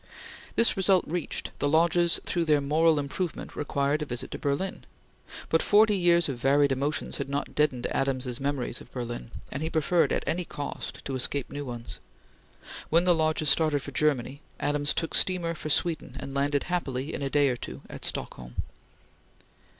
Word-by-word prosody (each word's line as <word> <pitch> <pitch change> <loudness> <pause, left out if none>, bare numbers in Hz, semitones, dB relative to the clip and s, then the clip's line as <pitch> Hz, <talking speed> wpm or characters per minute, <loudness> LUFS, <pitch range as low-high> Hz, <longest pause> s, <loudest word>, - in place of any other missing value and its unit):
This 230 - +4
result 190 -1 +4
reached, 170 0 -3
the 145 - +1
Lodges 170 +2 +3
thought 170 -2 0
their 150 -1 +4
moral 155 +3 +3
improvement 145 +5 -3
required 145 +1 0
a - - -1
visit 120 -1 -5
to - - -5
Berlin; 145 +7 -2 0.6
but - - +2
forty 210 0 +5
years 175 -2 +4
of 135 -4 -4
varied 140 +2 +3
emotions 140 +4 -1
had 140 - -3
not 140 +1 -3
deadened 135 -5 +1
Adams's 130 -2 -1
memories 140 -3 -2
of - - -14
Berlin, 120 -2 -5 0.2
and 140 - -4
he 160 - -1
preferred, 165 +2 +2
at - - 0
any 170 +4 -1
cost, 145 -3 -6
to 135 - -3
escape 130 +1 -2
new 145 0 -5
ones. 120 -2 -6 0.9
When 165 +2 +4
the 180 -1 +4
Lodges 155 -2 +1
started 155 -4 +2
for 140 - -6
Germany, 140 -1 0 0.2
Adams 145 0 +1
took 165 - -2
steamer 175 -3 +2
for 155 -1 -6
Sweden 155 -4 +1
and 135 - -7
landed 140 +1 +1
happily, 145 -5 -2
in - - -4
a 135 - -1
day 145 0 +3
or 125 - 0
two, 65 - -8
at - - -9
Stockholm. - - -5
145 Hz, 175 wpm, -27 LUFS, 135-165 Hz, 0.9 s, forty